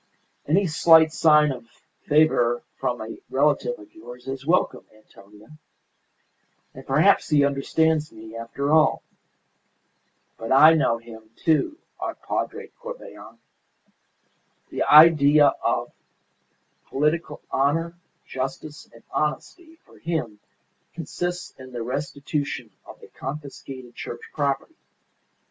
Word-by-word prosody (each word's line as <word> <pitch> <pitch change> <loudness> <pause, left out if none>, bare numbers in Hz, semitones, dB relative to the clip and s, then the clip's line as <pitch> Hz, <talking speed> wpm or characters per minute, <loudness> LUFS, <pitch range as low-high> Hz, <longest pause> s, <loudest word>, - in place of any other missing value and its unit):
"Any 190 +7 +3
slight 160 -1 +5
sign 150 -2 +4
of 125 -3 -8 0.4
favour 145 -6 +3 0.2
from 120 -1 -2
a 110 +1 -7
relative 135 -3 +1
of 105 - -16
yours 120 +3 -12
is 135 +1 -6
welcome, 180 +2 +1
Antonia. 105 +6 -18 1.1
And 135 +1 -13
perhaps 160 +7 +3
he 145 -2 +4
understands 150 +3 0
me, 110 0 -12
after 115 +5 -3
all! 155 -1 +3 1.4
But 115 +2 -6
I 150 +5 +8
know 140 -7 +2
him, 110 -1 -13
too, 170 - 0 0.2
our - - -4
Padre - - -4
Corbelan. - - -10 1.3
The - - -4
idea 150 -2 +7
of - - -1 1.0
political 150 +2 -1
honour, 165 +5 0 0.3
justice, 135 +3 -6
and 115 - -18
honesty 320 - -3
for - - -20
him 155 -11 -3 0.6
consists 175 +2 -4
in 130 0 -11
the 120 -1 -4
restitution 140 -1 -4 0.2
of - - -12
the - - -13
confiscated 135 -3 -8
Church 120 0 -7
property. 140 - -2
140 Hz, 110 wpm, -24 LUFS, 125-155 Hz, 1.4 s, I